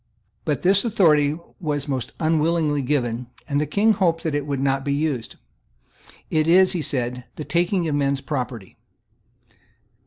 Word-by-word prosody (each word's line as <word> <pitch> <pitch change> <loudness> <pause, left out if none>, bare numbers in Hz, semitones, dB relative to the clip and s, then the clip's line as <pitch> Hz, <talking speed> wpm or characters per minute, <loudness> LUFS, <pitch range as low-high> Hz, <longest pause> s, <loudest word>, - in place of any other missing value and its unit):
But - - -1
this 195 +2 +4
authority 155 -10 +3 0.2
was 150 -4 -2
most 130 -3 -3
unwillingly 155 -2 +1
given; 125 -3 -1 0.2
and 145 0 0
the 150 - -1
King 210 +8 +3
hoped 170 -4 +1
that 160 -3 -1
it 145 0 -2
would 140 -2 -2
not 135 0 0
be 140 0 0
used. 145 -6 -2 1.0
"It 155 0 +2
is," 185 +2 +5
he 175 - -2
said, 125 -3 -3
"the 150 - -6
taking 175 +1 +1
of 155 - -1
men's 140 -1 +1
property." 125 -8 -5
150 Hz, 155 wpm, -23 LUFS, 135-165 Hz, 1.0 s, is